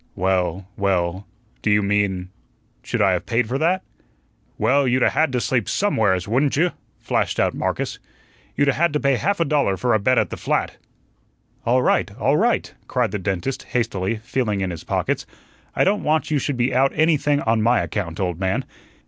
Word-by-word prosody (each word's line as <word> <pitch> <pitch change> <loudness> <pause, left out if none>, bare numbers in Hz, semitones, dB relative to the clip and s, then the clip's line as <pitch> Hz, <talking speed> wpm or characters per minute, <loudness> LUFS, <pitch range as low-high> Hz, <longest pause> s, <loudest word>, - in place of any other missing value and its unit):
"Well 90 0 0
well 95 -1 0 0.3
do - - 0
you 105 0 +3
mean 100 -2 0 0.5
should 125 -4 -1
I 95 - +4
have 90 - -2
paid 115 0 +1
for 130 +4 -2
that?" 180 +4 +1 0.7
"Well, 135 +5 +2
you'd 125 +1 +2
'a' - - +4
had 160 -2 +1
to 125 - +1
sleep 125 0 0
SOMEWHERES, 105 - +1
wouldn't 130 +6 +1
you?" 170 +5 +2 0.3
flashed - - -1
out - - +2
Marcus. - - -2 0.6
"You 145 - +2
'a' 140 - +4
had 170 +1 +1
to 150 - +1
pay 140 -3 +2
half 200 +8 0
a 165 - +2
dollar 140 -10 +1
for 120 +4 +1
a 110 - +3
bed 130 +5 +2
at - - +1
the - - -5
flat." - - -1 0.9
"All 125 +2 +3
right, - - +2
all - - +2
right," - - +1
cried - - 0
the 105 - -3
dentist, 95 +7 -2
hastily, 115 -4 -1
feeling 110 -2 -2
in 95 -1 -1
his 85 - -7
pockets. - - -2 0.5
"I - - +3
don't 205 +2 +2
want 155 -1 0
you 150 - +2
should 135 0 -2
be 125 +2 +1
out 135 +2 +3
anything 150 -2 +2
on 115 0 +1
my 120 +3 +3
account, 85 -6 -4
old 90 -3 -2
man. 95 0 -1
115 Hz, 195 wpm, -22 LUFS, 95-140 Hz, 0.9 s, I